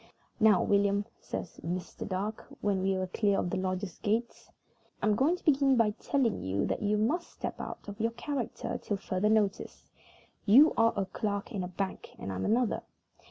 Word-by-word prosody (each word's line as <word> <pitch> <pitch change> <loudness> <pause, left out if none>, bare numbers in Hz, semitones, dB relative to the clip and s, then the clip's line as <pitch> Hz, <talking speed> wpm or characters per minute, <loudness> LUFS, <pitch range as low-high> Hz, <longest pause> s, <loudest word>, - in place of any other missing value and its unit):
"Now, 215 -4 +5
William," 200 0 +2
says 170 - -6
Mr. 180 +2 -4
Dark, 200 +3 -3
when 200 -2 +1
we 190 0 +1
were 185 - -1
clear 200 +2 +1
of 175 - -1
the - - -1
lodge 185 0 -3
gates, 230 +3 -1 0.5
"I'm 215 - +2
going 275 +11 +3
to 360 - -15
begin 275 -4 +4
by 225 -2 +4
telling 235 +1 0
you 95 +1 -1
that - - -2
you 210 0 +1
must 295 +12 0
step - - -6
out - - -7
of 205 +1 -7
your 225 - +2
own 230 - -17
character 280 -6 -3
till 205 - -2
further 195 +1 0
notice. 215 -2 0 0.5
You 270 +10 +7
are 230 0 +4
a 195 - +1
clerk 200 +2 -3
in 200 -5 -2
a - - -3
bank, 190 +2 -5
and 95 - -5
I'm 95 - -2
another. 235 +1 +1
205 Hz, 190 wpm, -30 LUFS, 190-230 Hz, 0.5 s, You